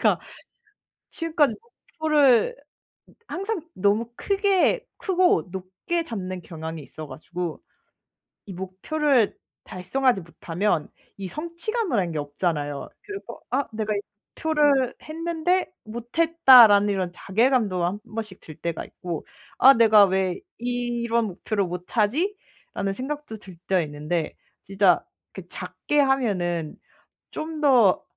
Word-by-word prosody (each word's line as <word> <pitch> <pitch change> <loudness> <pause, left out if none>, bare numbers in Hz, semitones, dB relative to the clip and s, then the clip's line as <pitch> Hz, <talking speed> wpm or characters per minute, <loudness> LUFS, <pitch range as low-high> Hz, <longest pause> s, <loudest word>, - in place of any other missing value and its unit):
제가 - - +3 0.9
지금까지 315 -6 +1
목표를 310 - +2 0.7
항상 390 +2 -3
너무 210 +5 +1
크게 400 +3 +2
크고 365 - +2
높게 190 - -3
잡는 185 - -5
경향이 160 -1 -7
있어 155 +2 -9
가지고 175 +1 -6 0.8
이 195 - -7
목표를 225 - 0 0.3
달성하지 195 +3 0
못하면 170 0 -2 0.3
이 190 -2 -5
성취감이란 335 - -2
게 155 - -3
없잖아요. 145 -1 -2
그래서 405 -1 -8
'아 270 +2 +1
내가 215 -1 -2
이 200 - -1 0.4
목표를 295 -5 +2
했는데 335 +3 -1
못했다.'라는 240 -3 +6
이런 185 -3 -1
자괴감도 210 -3 +1
한 190 +4 -2
번씩 215 -4 -5
들 155 - -11
때가 170 -2 -4
있고 175 -3 -6 0.3
'아 270 +2 +8
내가 220 -3 +7
왜 190 -1 0 0.2
이런 240 -1 -1
목표를 200 +2 -2
못 180 +6 -7
하지?'라는 250 - -1
생각도 275 -1 -5
들 190 -4 -13
때가 185 -2 +3
있는데. 155 +2 -3 0.3
진짜 195 -2 +3 0.3
그 190 -2 -9
작게 185 +12 -2
하면은 190 - 0 0.6
좀 315 0 -5
더 245 -10 +5
220 Hz, 245 characters per minute, -24 LUFS, 180-300 Hz, 0.9 s, 아